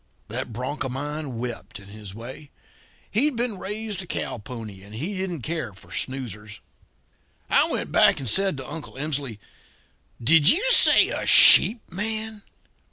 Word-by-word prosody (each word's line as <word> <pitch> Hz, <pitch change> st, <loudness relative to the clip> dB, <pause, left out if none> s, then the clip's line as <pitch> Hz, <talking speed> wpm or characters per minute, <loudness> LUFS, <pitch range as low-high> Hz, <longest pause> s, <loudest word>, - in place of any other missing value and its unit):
"That -, -, -5 dB
bronc 130 Hz, +7 st, -5 dB
of 130 Hz, -, -5 dB
mine 145 Hz, -1 st, -5 dB
wept, 120 Hz, -1 st, -7 dB
in 100 Hz, 0 st, -15 dB
his 105 Hz, -2 st, -11 dB
way. 130 Hz, +6 st, -11 dB, 0.6 s
He'd 270 Hz, +6 st, 0 dB
been 230 Hz, -4 st, -3 dB
raised 210 Hz, 0 st, -5 dB
a 180 Hz, -, -9 dB
cow 125 Hz, -, -5 dB
pony 110 Hz, -4 st, -10 dB
and 100 Hz, +2 st, -13 dB
he 165 Hz, -, -5 dB
didn't 185 Hz, -7 st, -5 dB
care 155 Hz, -9 st, -4 dB
for 95 Hz, -, -18 dB
snoozers. 105 Hz, -6 st, -6 dB, 0.9 s
"I -, -, +4 dB
went -, -, -3 dB
back -, -, +3 dB
and 135 Hz, -, -6 dB
said 190 Hz, -, +2 dB
to 135 Hz, -, -8 dB
Uncle 160 Hz, -, -9 dB
Emsley: 140 Hz, -5 st, -4 dB, 0.8 s
'Did 150 Hz, +5 st, +5 dB
you 390 Hz, +9 st, +3 dB
say -, -, +7 dB
a -, -, -4 dB
sheep 225 Hz, +1 st, +7 dB
man?' 215 Hz, +3 st, -5 dB
145 Hz, 160 wpm, -23 LUFS, 115-195 Hz, 0.9 s, say